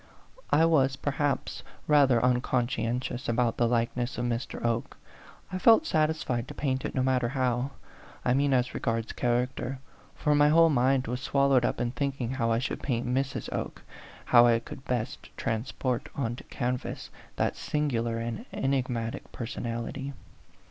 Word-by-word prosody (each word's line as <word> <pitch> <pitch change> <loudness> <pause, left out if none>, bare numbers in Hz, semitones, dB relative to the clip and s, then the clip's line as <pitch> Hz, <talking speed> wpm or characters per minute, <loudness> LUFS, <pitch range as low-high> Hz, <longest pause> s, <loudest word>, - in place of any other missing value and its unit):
I 160 - +5
was, 135 -5 +3
perhaps, 145 0 -1 0.2
rather 140 -5 +5
uncon 125 -1 +2
scientious 125 0 -2
about 120 0 +1
the 120 - +3
likeness 120 +2 -1
of 120 - -1
Mr. 120 0 -3
Oke; 115 0 -1 0.6
I 185 - -1
felt 230 - +6
satisfied 155 - 0
to - - -9
paint 130 -2 -1
it - - -4
no 130 - +2
matter 130 -2 +1
how, 130 -1 0 0.6
I 125 - +3
mean 140 +1 +2
as 125 -1 +2
regards 115 0 -2
character, 125 +2 -1 0.4
for 150 - +1
my 145 0 +5
whole 165 +1 +6
mind 130 0 +3
was 125 +2 -3
swallowed 140 -2 +3
up - - -1
in 120 0 0
thinking 135 -1 -2
how 115 -3 0
I 115 - +3
should 125 - -3
paint 120 -4 -1
Mrs. 130 +2 -1
Oke, - - -4 0.4
how 120 -1 +7
I 115 -1 +5
could 115 +3 -9
best 120 -3 -3
transport 120 +1 -2
on 120 -4 -1
to - - -11
canvas 125 -1 -3 0.2
that - - 0
singular 120 -6 -1
and 115 -1 -4
enigmatic 125 -4 -2
personality. 120 +3 -4
125 Hz, 155 wpm, -28 LUFS, 120-135 Hz, 0.6 s, how